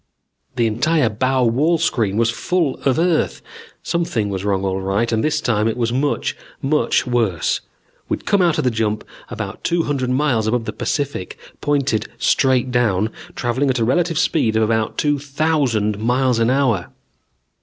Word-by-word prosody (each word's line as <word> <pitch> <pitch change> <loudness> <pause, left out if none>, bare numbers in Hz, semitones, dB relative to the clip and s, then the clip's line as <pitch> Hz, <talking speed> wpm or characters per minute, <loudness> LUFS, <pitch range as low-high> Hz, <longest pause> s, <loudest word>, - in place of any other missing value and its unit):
The 120 -2 +2
entire 125 +4 +2
bow 130 +4 +1
wall 140 +9 +2
screen 115 -11 0
was 115 0 +2
full 160 +2 -1
of 135 -2 +2
Earth. 170 -1 +1 0.4
Something 165 -12 -1
was 95 -1 -3
wrong 100 -1 0
all 95 0 -1
right, 100 +5 0
and 110 -1 +1
this 155 0 +1
time 110 -5 +1
it 115 - -1
was 115 -1 0
much, 140 +3 0 0.2
much 150 +1 +1
worse. 115 -9 0 0.5
We'd - - -3
come 200 - +3
out 170 -3 +2
of - - 0
the 125 - +2
jump 110 -1 -1 0.3
about - - -6
two 170 -1 +1
hundred 135 -4 -1
miles 125 -5 +1
above 115 +1 0
the - - -4
Pacific, 140 -10 -3 0.2
pointed 140 -7 0
straight 130 -2 +2
down, 110 -4 +1 0.2
traveling 130 +4 0
at 130 - +1
a 115 - +1
relative 165 +6 +1
speed 115 -10 +1
of 110 - +3
about 110 0 0
two 145 -1 +1
thousand 135 -8 0
miles 125 +1 +1
an 115 +1 +2
hour. 130 -8 +1
125 Hz, 170 wpm, -20 LUFS, 110-145 Hz, 0.5 s, come